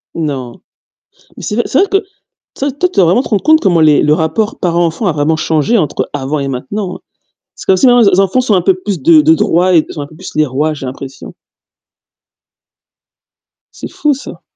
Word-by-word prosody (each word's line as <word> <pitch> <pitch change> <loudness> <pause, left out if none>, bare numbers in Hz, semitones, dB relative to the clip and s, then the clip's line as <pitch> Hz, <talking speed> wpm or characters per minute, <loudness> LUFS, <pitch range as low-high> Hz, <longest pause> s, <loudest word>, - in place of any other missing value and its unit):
Non. 135 -7 -5 0.8
Mais - - -10
c'est 210 - -3
vrai 240 - +1
c'est 270 - +1
vrai 395 - +3
que, 395 - +4
tu 390 - -5 0.5
sais, 280 +1 -1
toi, 350 +7 -1
tu - - -18
dois 190 - +5
vraiment 180 +9 +3
te - - -8
rendre 205 -3 0
compte 315 +1 +4
comment 175 -5 +2
les 155 -2 +4
le 150 0 +3
rapport 205 +8 -1
parent-enfant 170 +2 -1
a - - +2
vraiment 150 +1 0
changé 160 +8 0
entre 155 -8 -2
avant 145 +1 -3
et 140 - -3
maintenant, 180 +9 -4
hein. - - -24 0.6
C'est - - -12
comme 190 - +4
si, 225 - +3
maintenant 245 -1 +5
les 210 - +5
en - - +1
les 185 - +3
enfants 195 +6 +1
sont 240 -5 +1
un 180 - +2
peu 190 +2 +3
plus 185 -3 -5
de 160 +1 +6
de 160 +2 +4
droits 180 +3 +1
et 155 - +3
sont 150 - -7
un 145 - -6
peu 155 - -17
plus - - -10
les 155 0 +2
rois, 150 +4 -1
j'ai 140 -3 -7
l'impression. 135 +1 -9 2.4
C'est - - -8
fou 300 -1 0
ça. 270 - -10
170 Hz, 230 wpm, -13 LUFS, 150-210 Hz, 2.4 s, de